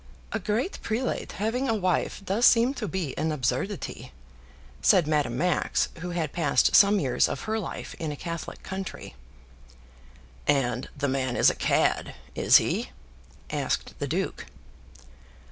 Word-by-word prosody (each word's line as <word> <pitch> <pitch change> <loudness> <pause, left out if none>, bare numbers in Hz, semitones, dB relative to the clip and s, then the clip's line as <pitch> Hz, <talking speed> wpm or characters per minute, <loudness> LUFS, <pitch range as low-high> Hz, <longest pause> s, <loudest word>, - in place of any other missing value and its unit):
"A 220 - -1
great 220 - -2
prelate 235 +4 -2
having 235 +6 -1
a 225 - +2
wife 185 0 -1
does 210 +6 +4
seem 240 +3 +4
to 235 -6 -4
be 175 -6 -3
an 160 +1 0
absurdity," 135 - -3 0.7
said 170 - +5
Madame 145 -6 0
Max, 175 +2 +1
who 180 +2 -5
had 165 -4 -2
passed 170 - +3
some 200 0 +6
years 130 -6 +2
of 135 - -4
her 220 +1 -2
life 195 - -6
in 160 -3 -3
a - - -4
Catholic 170 +3 -6
country. 190 - -6 1.3
"And 125 -2 +1
the 140 0 0
man 130 -2 -1
is - - +5
a - - -7
cad; - - +1 0.2
is - - +6
he?" - - -1 0.6
asked - - -2
the - - -2
duke. - - -3
180 Hz, 145 wpm, -27 LUFS, 145-210 Hz, 1.3 s, some